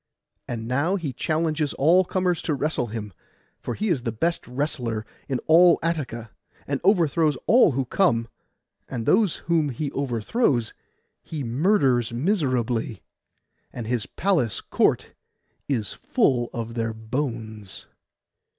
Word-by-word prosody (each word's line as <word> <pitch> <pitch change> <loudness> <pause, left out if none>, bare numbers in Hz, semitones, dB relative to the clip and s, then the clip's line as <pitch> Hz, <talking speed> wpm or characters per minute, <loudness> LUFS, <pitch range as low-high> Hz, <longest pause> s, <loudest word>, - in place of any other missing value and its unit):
And 115 -2 -4
now 140 +10 +1
he 160 -9 -3
challenges 155 +1 -1
all 170 +6 +5
comers 180 -2 0
to 155 - -1
wrestle 145 -3 -1
with 110 - -7
him, 105 -3 -5 0.5
for - - -4
he 215 - -2
is 155 -8 +1
the 120 -1 -2
best 165 +10 -1
wrestler 125 -4 -2 0.2
in 130 - 0
all 170 +1 +6
Attica, 130 -9 -3 0.3
and 140 -1 -2
overthrows 165 -6 +3
all 235 - +5
who 135 +1 -1
come; 120 -6 +2 0.6
and 120 -4 -4
those 200 - +3
whom 165 -3 +2
he 140 +3 -3
overthrows 125 - 0 0.5
he 155 -3 -5
murders 130 - +2
miserably, 125 - -1 0.7
and 120 - -6
his 120 +1 -1
palace 160 - 0
court - - +1 0.6
is 115 -7 -1
full 130 - +1
of 115 -1 -5
their 115 -1 -2
bones. 110 -4 -5
135 Hz, 130 wpm, -24 LUFS, 115-165 Hz, 0.7 s, all